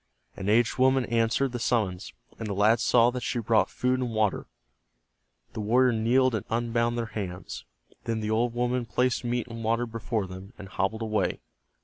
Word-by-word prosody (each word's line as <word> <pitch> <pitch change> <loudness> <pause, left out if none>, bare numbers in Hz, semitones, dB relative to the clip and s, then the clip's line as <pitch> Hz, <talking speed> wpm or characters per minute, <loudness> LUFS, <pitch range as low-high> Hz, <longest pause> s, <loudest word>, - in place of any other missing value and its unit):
An 100 +1 -4
aged 115 +3 +2
woman 130 0 +4
answered 115 +3 +1
the 120 - -4
summons, 105 -7 -1 0.3
and 115 - -4
the 100 - -3
lads 110 +3 +3
saw 120 0 +4
that 125 0 -4
she 120 - -2
brought 115 -1 +2
food 125 0 0
and 125 -2 -1
water. 110 -3 0 1.1
The - - -6
warrior 125 +4 +3
kneeled 125 +3 +2
and 110 - -1
unbound 115 0 0
their 120 - -1
hands. 90 -4 -6 0.4
Then 115 -1 -1
the 110 0 -2
old 115 +2 +1
woman 120 0 -1
placed 125 +1 0
meat 120 0 -1
and 115 -1 -7
water 115 +2 +1
before 115 -2 -3
them, 95 +3 -10
and 95 -2 -10
hobbled 105 +3 -2
away. 110 -3 -1
115 Hz, 180 wpm, -27 LUFS, 110-120 Hz, 1.1 s, woman